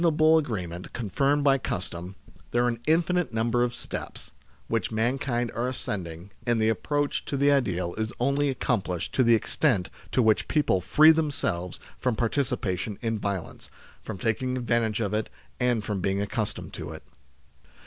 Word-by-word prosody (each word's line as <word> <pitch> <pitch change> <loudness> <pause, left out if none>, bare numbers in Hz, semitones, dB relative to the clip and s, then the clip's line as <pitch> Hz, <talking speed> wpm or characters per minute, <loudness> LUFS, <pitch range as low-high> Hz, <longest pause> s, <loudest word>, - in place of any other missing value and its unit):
121 165 -3 +3 0.2
able 160 - +7
agreement 90 - -5
confirmed 135 +6 +1
by 135 -1 +4
custom, 90 -3 -4 0.3
there 120 +1 +2
are - - +3
an 115 -1 -1
infinite 175 +2 +2
number 115 +1 +1
of 120 0 0
steps, - - -6 0.4
which 115 -1 0
mankind 120 +1 0
are 120 +2 -1
ascending, 95 -7 -4
and 120 -1 +1
the 110 0 +3
approach 145 +7 0
to 140 - -3
the 140 +1 +4
ideal 90 -11 +1
is 110 +1 -1
only 140 +3 +2
accomplished 100 -9 -1
to - - +3
the 120 -2 +6
extent 110 - +1 0.2
to 125 - +3
which 110 -1 +3
people 145 - +2
free 155 - +7
themselves 140 - -1 0.2
from 125 -3 0
participation 110 -6 -1
in 115 -1 -1
violence, 100 -4 -4 0.3
from - - -6
taking 125 +5 -1
advantage 115 -3 0
of 105 -3 -1
it, 110 0 -1 0.3
and 125 -3 +1
from 100 -3 -2
being 95 +1 0
accustomed 100 +1 -3
to - - -6
it. - - -9
115 Hz, 165 wpm, -27 LUFS, 100-135 Hz, 0.4 s, able